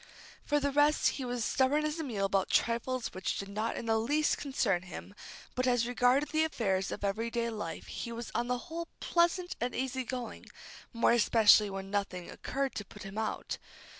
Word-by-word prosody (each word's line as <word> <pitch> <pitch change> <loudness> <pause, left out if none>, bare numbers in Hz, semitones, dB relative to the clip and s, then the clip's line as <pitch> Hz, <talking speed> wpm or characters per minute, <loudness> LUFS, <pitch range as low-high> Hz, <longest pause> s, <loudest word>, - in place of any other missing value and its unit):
For 295 -1 +2
the 285 0 0
rest, 295 +2 +4
he 265 - -4
was 245 -2 -2
stubborn 275 +6 +2
as 305 +2 -2
a - - -1
mule 215 -8 -1
about 195 -1 +1
trifles 235 +2 0
which 185 0 -2
did 195 - -5
not 215 +3 -2
in - - -4
the 225 -1 +2
least 295 +7 +1
concern 225 -10 +1
him, 185 +2 -9 0.4
but 255 +1 0
as 245 -2 +3
regarded 250 +4 +3
the 315 0 +2
affairs 195 -11 0
of - - -5
every 215 +4 0
day 235 0 -1
life 190 -7 -5
he 235 - -5
was 235 0 -6
on 240 - 0
the 250 0 +1
whole 335 0 -5
pleasant 350 +2 +1
and 245 +1 -1
easy 260 0 -1
going, 250 -1 -6 0.4
more 230 -1 +3
especially 220 -2 +6
when 195 0 -6
nothing 200 -3 -2
occurred 275 -1 -2
to 205 - -3
put - - -11
him 195 +2 -5
out. 220 - -3
240 Hz, 195 wpm, -31 LUFS, 205-275 Hz, 0.4 s, especially